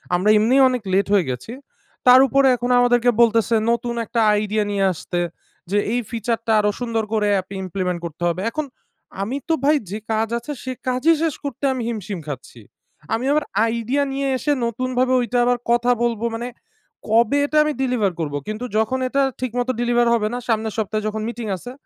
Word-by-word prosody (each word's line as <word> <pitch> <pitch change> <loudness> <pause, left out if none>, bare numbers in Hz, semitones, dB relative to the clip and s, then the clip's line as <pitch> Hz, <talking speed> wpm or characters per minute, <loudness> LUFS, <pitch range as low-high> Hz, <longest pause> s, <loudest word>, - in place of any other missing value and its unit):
আমরা 185 +4 +1
এমনি 225 +5 +3
অনেক 250 -1 -2
লেট 195 +1 +2
হয়ে 195 -7 +3
গেছি। 125 - -5 0.5
তার 250 +1 +9
ওপরে 275 +1 +3
এখন 245 +1 -3
আমাদের 245 0 +4 0.2
বলতেসে, 230 -1 +3
নতুন 235 0 -1
একটা 230 - -2 0.2
আইডিয়া 210 +1 0
নিয়ে 200 -1 +1
আসতে, 175 +1 -4 0.5
যে 205 - +2 0.2
এই 245 - +1
feature 230 0 -2
টা 225 - +3
আরও 210 0 +2
সুন্দর 230 -2 -1
করে 210 -1 +1
অ্যাপে 190 +1 -3
implement 180 -1 -2
করতে 170 +1 -7
হবে। 170 +2 -3
এখন 310 +3 -3 0.6
আমি 240 +7 -3
তো - - +4
ভাই 300 +2 +5 0.2
যে 210 - -3
কাজ 220 +1 +1
আছে, 240 +5 -7
সেই 255 0 -4
কাজই 260 +6 +3
শেষ 320 -4 0
করতে 280 -2 -6
আমি 255 - -4
হিমশিম 210 -4 -5
খাচ্ছি; 130 -4 -8 0.5
আমি 230 +3 -1
আবার 300 +1 +2 0.2
আইডিয়া 235 +5 0
নিয়ে 275 0 -1
এসে 295 - -1
নতুনভাবে 255 +2 0
ওইটা 245 0 -1
আবার 245 0 +2
কথা 240 +1 +3
বলবো; 235 -1 -1
মানে 235 +2 -4 0.6
কবে 230 +5 +3
এটা 305 +1 -1
আমি 305 0 -1
ডেলিভার 245 -7 +1
করবো? 145 -3 -2
কিন্তু 215 +3 -4
যখন 220 +4 +1
এটা 275 +2 +1 0.2
ঠিকমতো 245 0 -1
ডেলিভার 240 0 +2
হবে 220 -2 +1
না, - - -2
সামনের 220 -2 0
সপ্তাহে 215 0 -2
যখন 215 0 -3
মিটিং 235 -1 -6
আছে, 245 +7 -9
235 Hz, 190 wpm, -21 LUFS, 210-250 Hz, 0.6 s, তার